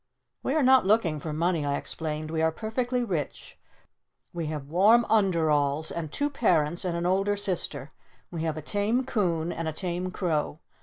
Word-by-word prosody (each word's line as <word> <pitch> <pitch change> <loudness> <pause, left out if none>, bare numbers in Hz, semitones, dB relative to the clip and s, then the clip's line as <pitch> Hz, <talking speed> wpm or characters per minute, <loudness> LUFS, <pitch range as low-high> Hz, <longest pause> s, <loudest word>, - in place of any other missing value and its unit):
"We 270 - -1
are 310 - +3
not 260 0 +6
looking 195 -8 +2
for 155 +2 -5
money," 165 +1 0
I 140 0 0
explained. 155 -1 -4
"We 160 -1 -1
are 160 0 +3
perfectly 245 +6 -2
rich. 170 - -4 0.7
We 170 -2 -3
have 150 -2 -4
warm 210 +9 +5
underalls. 160 -7 +2
And 160 -3 -4
two 290 - -1
parents. 175 - +1
And 175 -2 -1
an 170 - -2
older 195 +3 +2
sister. 170 -8 -2 0.4
We 170 -2 -4
have 160 -1 -2
a 155 - -6
tame 210 - 0
coon. 175 -9 0
And 165 -1 -4
a 160 - -2
tame 180 +2 -3
crow. 160 -5 -1
170 Hz, 175 wpm, -27 LUFS, 155-205 Hz, 0.7 s, not